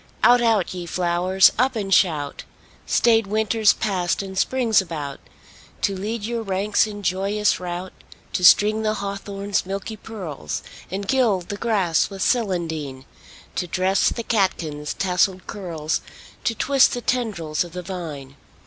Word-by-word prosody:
Out, 245 0 +6
out, 225 -7 +2
ye 175 -2 -6
flowers! 180 +2 +3
Up 260 +1 +2
and 195 -3 -1
shout! 150 -7 +2 0.4
Staid 225 -3 +3
Winter's 215 +1 +3
passed 190 -3 -1
and 190 -1 -8
Spring's 230 0 +2
about 150 -6 -6 0.6
To 200 - +1
lead 210 +3 -4
your 230 +1 -2
ranks 200 +1 +1
in 205 -1 -8
joyous 200 +3 +1
rout; 180 +1 -5 0.4
To 180 - -1
string 210 +4 +6
the 215 0 0
hawthorn's 200 0 -3
milky 195 +3 -5
pearls, 180 - -6 0.3
And 195 +2 -4
gild 215 -9 +1
the 205 - -3
grass 195 -7 +1
with 195 -2 -4
celandine; 160 - -1 0.5
To 180 - -2
dress 185 +2 +2
the 235 - -4
catkins' 170 -9 -1
tasselled 185 0 +1
curls, 165 -6 -3 0.4
To 230 - +1
twist 275 +3 +4
the 245 - -4
tendrils 200 -13 -1
of 175 -2 -11
the 180 0 -5
vine. 150 -7 -7
195 Hz, 145 wpm, -22 LUFS, 175-215 Hz, 0.6 s, Out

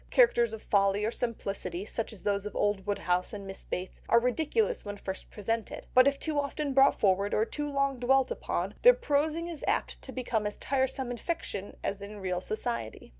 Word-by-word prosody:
Characters 240 - +4
of 220 -1 -7
folly 200 0 +2
or 220 - 0
simplicity 200 -6 -3
such 225 +1 -3
as 215 - -11
those 200 0 0
of - - -9
old 205 -1 0
Woodhouse 180 -2 0
and 200 -1 -6
Miss 195 0 -8
Bates, 185 +1 -5
are 235 - +7
ridiculous 320 - +1
when 205 -1 -6
first 190 -1 -6
presented, 225 +2 -3
but 255 +1 +7
if 280 0 +2
too 305 0 -1
often 285 0 -2
brought 270 +1 +5
forward, 200 0 +2
or 215 - +3
too 295 +4 -4
long 275 -2 0
dwelt 260 +1 +3
upon, - - -2
their - - +8
prosing 315 -6 0
is 335 -3 -7
apt - - 0
to 265 - -7
become 235 -5 -1
as 210 - -5
tiresome 265 -1 0
in 245 - -4
fiction 225 - -4
as 200 0 -2
in 205 +1 -8
real 180 -2 -2
society." 215 - -4
230 Hz, 200 wpm, -30 LUFS, 200-275 Hz, -, their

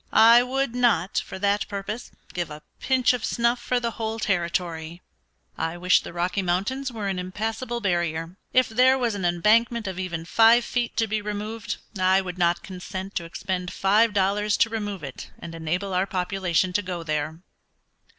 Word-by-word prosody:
I 230 +2 +8
would 260 0 -1
not, 230 -7 +2
for - - -8
that 200 +1 +1
purpose, 205 +3 -5 0.2
give 175 -2 -2
a 150 0 -9 0.2
pinch 260 0 +3
of 245 - -3
snuff 235 +1 +1
for 245 +1 0
the 235 -1 -2
whole 220 0 -3
territory. 170 -4 -2 0.6
I 165 +1 -2
wish 180 +1 +4
the - - -8
Rocky 175 +3 -1
Mountains 200 +10 -1
were 215 -4 -4
an 190 -2 -1
impassable 225 +6 -3
barrier. 170 -3 -1 0.2
If 255 -1 +4
there 255 +4 +4
was 240 -4 0
an 200 -2 -4
embankment 215 +6 +3
of 190 -2 -4
even 170 -3 -4
five 230 +5 +5
feet 240 -2 -2
to 225 - +3
be 215 0 -2
removed 210 +2 -4 0.2
I 185 +1 +4
would 185 -1 -5
not 170 0 +2
consent 190 +1 -7
to 170 - -3
expend 180 +1 -4
five 210 +4 +3
dollars 205 +1 +1
to 225 - +3
remove 205 -5 -4
it 135 -2 -8
and 165 - -9
enable 175 +4 -2
our 185 +2 +1
population 185 -1 0
to 205 - +2
go 180 -3 -5
there." 155 0 -2
195 Hz, 180 wpm, -25 LUFS, 175-225 Hz, 0.6 s, I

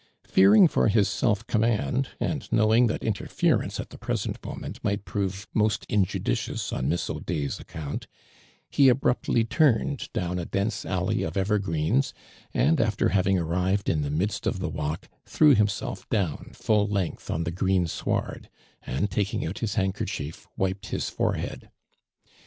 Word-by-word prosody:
Fearing 100 - +7
for - - +2
his 105 -1 +3
yelf 110 -1 +2
command, 120 +4 +1
and 150 - -3
knowing 110 +2 +4
that 110 - -2
interfe 105 -3 +1
rence - - -5
at - - -6
the - - -11
present - - -3
moment - - -7
might 100 0 -1
prove 100 +1 -3
most 105 -1 +1
injudicious 95 -11 -1
on 65 +3 -1
Miss 85 +2 0
Audefs 75 -5 -3
account, 75 -2 -6 0.6
he 140 -2 +5
abruptly 125 -2 +2
turned 140 +1 +1
down 90 0 -2
a 85 - -3
dense 100 +4 -2
alley 90 -1 0
of 80 +3 -3
evergreens, 100 - +1 0.4
and 150 0 +3
after 110 -2 +1
having 95 0 +2
arrived 90 +4 0
in 75 - +1
the 70 - -2
midst 95 +8 -1
of - - 0
the 90 -3 -2
walk, 75 0 -4 0.2
threw 150 -2 +5
himself 105 -4 -1
down 95 -8 -1
full 105 -1 +2
length 100 -4 -2
on 80 - -1
the 80 - -2
graen 95 0 +1
sward, - - -3 0.3
and 80 +10 -2
taking 100 +1 -1
out 80 +5 -4
his 110 -3 -2
handkerchief 95 -6 -3
wiped 95 +1 -1
his - - -2
forehead. - - -2
100 Hz, 155 wpm, -26 LUFS, 90-110 Hz, 0.6 s, Fearing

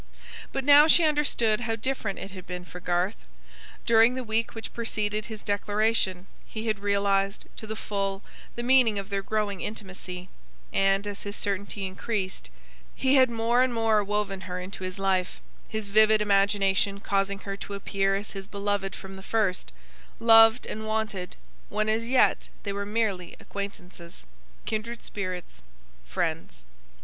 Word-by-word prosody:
But 270 - -2
now 290 +1 +8
she 335 +1 +7
understood 290 -8 +2
how 235 -2 -1
different 225 -4 -2
it 195 - -7
had 185 -2 -10
been 180 0 -6
for 180 - -9
Garth. 175 - -1 0.6
During 230 +2 +5
the 260 - -3
week 225 0 -1
which 225 - -7
preceded 215 -2 -2
his 220 -2 -8
declaration, 205 -2 0 0.2
he 220 0 -6
had 215 -2 0
realised, 200 0 +1
to 220 - -7
the 220 - -4
full, 195 -2 -3 0.3
the 240 - -4
meaning 245 -4 +5
of 200 0 -5
their 200 0 0
growing 205 -2 -2
intimacy; 185 -3 -6 0.5
and, 195 +1 +2
as 205 -1 -5
his 205 0 -4
certainty 200 0 -2
increased, 190 - -3 0.5
he 265 0 +2
had 260 -2 +6
more 235 +1 +2
and 255 -2 +2
more 220 -2 +3
woven 200 -1 -2
her 180 0 -3
into 185 +1 -7
his 185 0 -4
life; 190 -2 0 0.3
his 220 -2 -4
vivid 215 +1 +5
imagination 200 -1 +2
causing 200 0 0
her 195 -1 -4
to 200 - -6
appear 195 0 0
as 200 +1 -4
his 195 -1 -7
beloved 200 -1 -2
from 190 0 -9
the - - -9
first; 195 - 0 0.5
loved 225 +1 +7
and 220 0 -5
wanted, 215 -4 -2 0.3
when 215 +1 0
as 220 +1 0
yet 255 +1 +3 0.2
they 200 - -3
were 200 0 -3
merely 205 -5 -1
acquaintances; 180 - -8 0.4
kindred 230 +2 -4
spirits; 185 - -5 0.5
friends. - - -3
205 Hz, 160 wpm, -27 LUFS, 195-225 Hz, 0.6 s, now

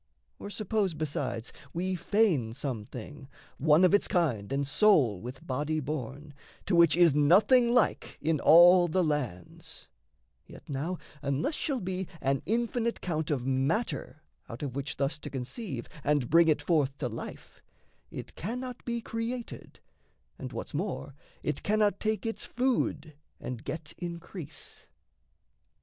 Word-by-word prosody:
Or - - -7
suppose, 205 -3 -1
besides, 140 -6 -3 0.2
We 185 +2 -1
feign 180 - +1
some 125 -5 -4
thing, 135 +5 -9 0.3
one 155 +4 +5
of 185 - +3
its 205 - +4
kind 125 - 0
and 140 +1 0
sole 140 - +4
With 125 +4 -8
body 150 +4 -1
born, 145 0 -5 0.3
to - - +1
which 170 -1 +5
is 170 -4 +6
nothing 205 - +5
like 245 -2 +1
In 155 0 0
all 175 +4 +8
the 180 +3 +1
lands: 130 - -4 0.6
yet - - -14
now 150 +6 -3 0.2
unless 140 - -1
shall 280 -4 -2
be 185 0 -3
An 135 0 0
infinite 235 +1 0
count 160 -4 -2
of 135 -5 -1
matter 140 - -1 0.3
out 115 +5 -7
of 135 -3 -4
which 140 +1 -3
Thus 140 +2 -1
to - - -7
conceive 135 - -5 0.2
and 145 -4 +1
bring 165 +1 +6
it 150 -2 +2
forth 145 -4 +1
to 135 - -2
life, 115 -1 -8 0.5
It - - -8
cannot 250 +5 -5
be 235 -1 -2
created 230 +2 -5 0.6
and - - -6
what's - - -6
more - - -3 0.3
It - - -2
cannot 210 -1 +2
take 215 +1 -1
its 225 - -3
food 245 -10 -1 0.3
and 125 -2 -6
get 155 +2 -6
increase. 170 -3 -8
155 Hz, 145 wpm, -29 LUFS, 135-200 Hz, 0.6 s, all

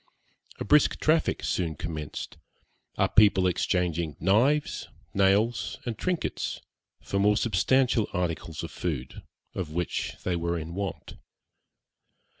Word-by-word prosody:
A - - -3
brisk 150 +7 +4
traffic 155 +1 +2
soon 85 -4 -1
commenced, 80 -2 -6 0.6
our - - +3
people 100 -3 +5
exchanging 85 -3 0
knives, 120 - +2 0.3
nails, 105 +4 +2
and 120 -2 -2
trinkets, 180 +5 -2 0.4
for 100 - -1
more 105 +1 +4
substantial 115 +2 +2
articles 85 -3 -3
of 85 - -6
food, 70 -6 -4 0.3
of 90 -5 -4
which 90 -1 -2
they 90 - 0
were 85 0 -1
in 80 +1 -6
want. 95 -1 -5
95 Hz, 115 wpm, -27 LUFS, 85-110 Hz, 0.6 s, people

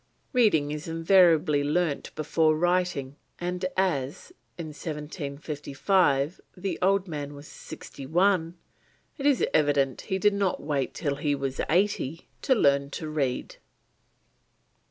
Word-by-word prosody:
Reading 185 - +3
is 150 +1 -5
invariably 165 -3 +4
learnt 150 0 0
before 155 +1 +2
writing, 175 -5 0 0.2
and 180 +1 -4
as 165 - -1 0.2
in 165 -2 -5
1755 150 +1 -1 0.2
the 195 +2 -3
old 195 +1 +2
man 145 -3 -5
was 145 +2 -11
sixty 135 -2 -10
one, 175 +1 +2 0.6
it 275 - +1
is 280 -4 +3
evident 140 -3 +2
he 190 - -2
did 205 +1 +3
not 200 -2 0
wait 145 -3 -2
till 140 -4 -2
he 145 0 0
was 135 -1 -3
eighty 170 -4 0
to 260 - +3
learn 140 - +3
to 155 +2 -5
read. 140 -5 -2
155 Hz, 125 wpm, -27 LUFS, 145-180 Hz, 0.6 s, invariably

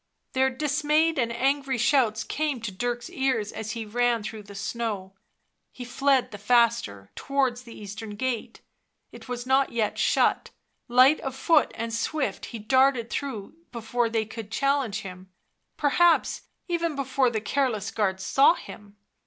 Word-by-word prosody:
Their 265 0 +3
dis 295 +3 -2
mayed 310 +1 +3
and 235 -2 +1
angry 270 +2 0
shouts 235 -3 +2
came 295 -1 -2
to 225 -2 -4
Dirk's 240 +6 -3
ears 260 - 0
as 220 0 -5
he 230 -2 -5
ran 235 +1 +1
through 215 +1 -6
the 200 0 -13
snow; 215 -2 -4 0.6
he 250 - -8
fled 270 +1 +1
the 205 - -8
faster, 215 - +1
towards 265 -3 -1
the 235 -2 -12
eastern 210 +1 -7
gate. 245 +1 -3 0.5
It - - -13
was 245 0 -4
not 265 +1 +2
yet 225 -3 -1
shut; - - +2 0.4
light 255 +5 +5
of 270 -1 -5
foot 320 +5 +3
and 230 0 -4
swift 270 +6 -2
he 235 - -7
darted 255 +1 +2
through 245 -9 -4 0.2
before 235 0 -1
they 225 -1 0
could 220 -1 -8
challenge 270 -5 0
him, 185 -1 -10 0.5
perhaps 330 +4 +2 0.2
even 335 -3 -1
before 265 -1 +1
the 225 -2 -2
careless 220 -3 -1
guards 190 -3 -1
saw 270 +7 +4
r 340 - +6
him. 205 -8 -12
240 Hz, 160 wpm, -26 LUFS, 220-270 Hz, 0.6 s, r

